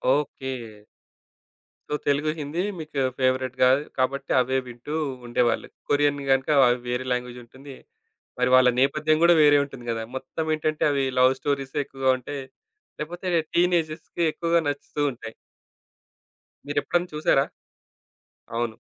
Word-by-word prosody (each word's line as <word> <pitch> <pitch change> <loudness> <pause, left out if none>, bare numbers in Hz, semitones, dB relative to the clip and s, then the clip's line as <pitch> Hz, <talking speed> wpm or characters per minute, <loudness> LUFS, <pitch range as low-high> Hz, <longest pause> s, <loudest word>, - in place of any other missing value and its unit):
Okay. 135 -2 -3 1.4
So, - - 0
Telugu, 145 +2 +2
Hindi 150 +4 -3 0.2
మీకు 155 -3 -5 0.2
ఫేవరెట్‌గా 130 -1 +2 0.3
కాబట్టి 135 +1 -1
అవే 130 +1 +1
వింటూ 120 +5 -8 0.3
ఉండేవాళ్ళు. 120 0 +1 0.2
కొరియన్ 145 0 +2
గనక 135 0 +3 0.2
అవి 120 0 +2
వేరే 125 +1 -2
లాంగ్వేజ్ 125 0 -2
ఉంటుంది. 135 +3 -13 0.6
మరి 125 0 +2
వాళ్ళ 130 -1 +6
నేపథ్యం 155 +3 +2
గూడా 175 - +7
వేరే 145 0 +6
ఉంటుంది 135 -4 -11
గదా! 115 0 -3
మొత్తం 135 +4 -4
ఏంటంటే 155 0 -1
అవి 140 -1 +1 0.2
లవ్ 130 +1 +6
స్టోరీసే 140 0 -2
ఎక్కువగా 135 -1 -1
ఉంటాయి. 135 +2 -6 0.6
లేకపోతే 175 +4 -5 0.3
టీనేజర్స్‌కి 170 -1 0
ఎక్కువగా 170 0 +1
నచ్చుతూ 145 +1 -4
ఉంటాయి. 115 -2 -9 1.3
మీరెప్పుడైనా 175 +4 0
చూసారా? 140 -2 +3 1.1
అవును. 115 -1 -2
140 Hz, 120 wpm, -25 LUFS, 130-150 Hz, 1.4 s, గూడా